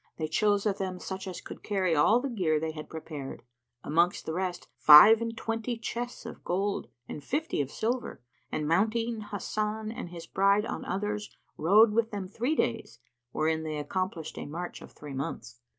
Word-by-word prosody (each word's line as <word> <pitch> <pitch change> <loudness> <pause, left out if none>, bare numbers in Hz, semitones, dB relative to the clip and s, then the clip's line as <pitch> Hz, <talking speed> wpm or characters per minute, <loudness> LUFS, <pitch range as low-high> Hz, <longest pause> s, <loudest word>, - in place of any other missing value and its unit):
They 155 - -2
chose 205 +5 +2
of 205 -2 0
them 185 -2 -3
such 190 +1 -6
as 185 - -6
could - - -10
carry 190 -5 0
all 210 +11 +5
the 270 +2 -3
gear 175 -10 +1
they 160 +1 -2
had 155 -1 -8
prepared; 155 -4 -7 0.4
amongst 170 +4 +1
the 160 - -3
rest 180 0 -3
five 200 +10 +9
and 230 -1 -3
twenty 225 +1 -2
chests 240 +2 -5
of - - -9
gold 195 +3 -1 0.2
and 145 - -7
fifty 295 - -1
of 135 - -3
silver; 240 - -2 0.3
and, 150 -1 -2
mounting 225 +6 +1
Hasan 215 +1 -3
and 225 - -6
his 170 -1 -9
bride 200 +2 +3
on - - -5
others, 210 +2 -3 0.2
rode 210 +7 +5
with 225 0 +2
them 200 -3 -5
three 245 +10 -1
days, 115 - -1 0.3
wherein 160 0 0
they 155 -1 -4
accomplished 165 +2 -3
a - - -6
march 175 +4 -6
of - - -12
three 145 -2 -10
months. 135 -2 -5
195 Hz, 180 wpm, -29 LUFS, 160-220 Hz, 0.4 s, five